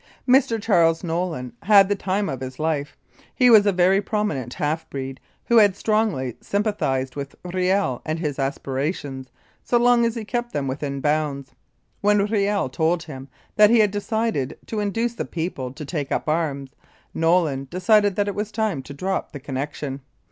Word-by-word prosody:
Mr. 255 Hz, -3 st, +4 dB
Charles 170 Hz, -6 st, +3 dB
Nolin 165 Hz, -7 st, -3 dB
had 200 Hz, -2 st, +6 dB
the 205 Hz, -, +1 dB
time 200 Hz, +1 st, -1 dB
of 135 Hz, -4 st, -4 dB
his 130 Hz, 0 st, -6 dB
life. 155 Hz, -2 st, -2 dB, 0.4 s
He 250 Hz, -2 st, +5 dB
was 210 Hz, -2 st, +7 dB
a -, -, +5 dB
very 185 Hz, +2 st, +3 dB
prominent 160 Hz, -, -2 dB
half 155 Hz, +2 st, -2 dB
breed, 135 Hz, -1 st, -6 dB, 0.3 s
who 235 Hz, -, +3 dB
had 205 Hz, -4 st, +6 dB
strongly 210 Hz, -, 0 dB
sympa 205 Hz, +1 st, -1 dB
thised 130 Hz, -6 st, -1 dB
with 140 Hz, -1 st, -6 dB
Riel 180 Hz, -6 st, 0 dB
and 155 Hz, +1 st, -2 dB
his 150 Hz, -4 st, -3 dB
aspirations, 135 Hz, 0 st, -3 dB, 0.3 s
so 240 Hz, -, +2 dB
long 240 Hz, 0 st, +4 dB
as 230 Hz, 0 st, 0 dB
he 225 Hz, -2 st, -5 dB
kept 240 Hz, +1 st, -3 dB
them 145 Hz, -2 st, -1 dB
within 140 Hz, +1 st, -3 dB
bounds. 145 Hz, -2 st, -1 dB, 0.5 s
When 205 Hz, 0 st, +3 dB
Riel 205 Hz, -4 st, 0 dB
told 165 Hz, +5 st, 0 dB
him 135 Hz, -4 st, -9 dB, 0.3 s
that 210 Hz, -1 st, +7 dB
he 235 Hz, -, +5 dB
had 210 Hz, -3 st, +4 dB
decided 205 Hz, -, -2 dB
to 220 Hz, -, -4 dB
induce 225 Hz, +3 st, -1 dB
the -, -, -4 dB
people 160 Hz, -7 st, -4 dB
to 145 Hz, +3 st, -8 dB
take 145 Hz, -2 st, -4 dB
up -, -, -1 dB
arms, 145 Hz, -4 st, -1 dB, 0.4 s
Nolin 165 Hz, -5 st, +1 dB
decided 205 Hz, +2 st, +3 dB
that 205 Hz, -1 st, 0 dB
it 205 Hz, -, -1 dB
was 210 Hz, +1 st, -4 dB
time 215 Hz, -10 st, -1 dB
to 140 Hz, +1 st, -10 dB
drop 190 Hz, +6 st, -2 dB
the 145 Hz, -, -7 dB
connection. 140 Hz, +1 st, -5 dB
175 Hz, 175 wpm, -23 LUFS, 140-210 Hz, 0.5 s, was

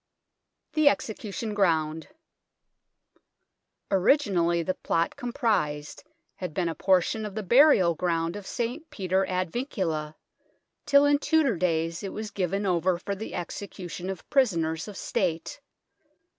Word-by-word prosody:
THE 310 Hz, -2 st, +5 dB
EXECUTION 220 Hz, -2 st, -3 dB
GROUND 160 Hz, -5 st, +1 dB, 1.8 s
Originally 185 Hz, -, +3 dB
the 185 Hz, -, -1 dB
plot 165 Hz, -2 st, -1 dB
comprised 215 Hz, -, -1 dB, 0.3 s
had 180 Hz, -4 st, -6 dB
been 180 Hz, -2 st, 0 dB
a 165 Hz, -, -1 dB
portion 190 Hz, +5 st, +2 dB
of 210 Hz, -2 st, -6 dB
the 215 Hz, -, -3 dB
burial 235 Hz, -, +5 dB
ground 165 Hz, +1 st, -1 dB
of 205 Hz, -2 st, -8 dB
St. 250 Hz, +7 st, -4 dB
Peter 190 Hz, 0 st, 0 dB
ad 185 Hz, -2 st, -1 dB
Vincula, 165 Hz, -, -3 dB, 0.7 s
till 280 Hz, 0 st, +6 dB
in 290 Hz, 0 st, +4 dB
Tudor 300 Hz, -, +2 dB
days 165 Hz, -2 st, 0 dB
it 195 Hz, -, -5 dB
was 215 Hz, -1 st, -5 dB
given 195 Hz, +1 st, -1 dB
over 180 Hz, -1 st, +1 dB
for 200 Hz, +3 st, -4 dB
the 210 Hz, +3 st, -6 dB
execution 180 Hz, 0 st, -6 dB
of 190 Hz, -3 st, -6 dB
prisoners 165 Hz, -, +1 dB
of 205 Hz, -2 st, -8 dB
State. 170 Hz, -3 st, -2 dB
190 Hz, 130 wpm, -27 LUFS, 170-220 Hz, 1.8 s, till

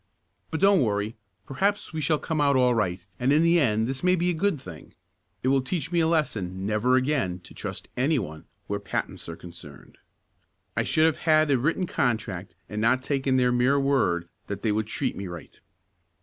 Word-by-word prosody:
"But 160 Hz, -, -3 dB
don't 195 Hz, -1 st, +5 dB
worry. 105 Hz, -1 st, -1 dB, 0.3 s
Perhaps 200 Hz, +9 st, -1 dB
we 160 Hz, -, -2 dB
shall 150 Hz, +1 st, +2 dB
come 155 Hz, 0 st, -2 dB
out 140 Hz, -1 st, +3 dB
all 125 Hz, -1 st, +4 dB
right, 90 Hz, -5 st, -1 dB
and 125 Hz, +2 st, +2 dB
in 155 Hz, +3 st, +4 dB
the 170 Hz, +1 st, +4 dB
end 110 Hz, -6 st, +2 dB
this 135 Hz, +3 st, -4 dB
may 180 Hz, 0 st, +4 dB
be 175 Hz, 0 st, +1 dB
a -, -, -1 dB
good 165 Hz, -1 st, 0 dB
thing. 85 Hz, -, -12 dB, 0.5 s
It 130 Hz, -, +2 dB
will 135 Hz, 0 st, +3 dB
teach 160 Hz, +4 st, -3 dB
me 175 Hz, -, +2 dB
a 160 Hz, -, +3 dB
lesson 105 Hz, -, -1 dB
never 110 Hz, +5 st, +2 dB
again 130 Hz, -9 st, +1 dB
to -, -, -14 dB
trust -, -, -6 dB
any 145 Hz, +5 st, +2 dB
one 80 Hz, -9 st, -5 dB, 0.2 s
where 100 Hz, 0 st, -3 dB
patents 100 Hz, -, -4 dB
are 85 Hz, -, -5 dB
concerned. 85 Hz, -5 st, -13 dB, 0.8 s
I -, -, +1 dB
should 155 Hz, -, +3 dB
have 160 Hz, -, +2 dB
had 155 Hz, -2 st, +3 dB
a 135 Hz, -, +4 dB
written 165 Hz, +8 st, 0 dB
contract 105 Hz, -, -2 dB
and 105 Hz, +2 st, -4 dB
not 130 Hz, +3 st, +2 dB
taken 135 Hz, -2 st, +1 dB
their 125 Hz, -1 st, +3 dB
mere 125 Hz, +3 st, +3 dB
word 110 Hz, -12 st, +1 dB, 0.2 s
that 100 Hz, 0 st, -5 dB
they 110 Hz, -, +2 dB
would 110 Hz, 0 st, -1 dB
treat -, -, -2 dB
me 100 Hz, -, -5 dB
right." 85 Hz, -1 st, -10 dB
130 Hz, 205 wpm, -26 LUFS, 100-155 Hz, 0.8 s, don't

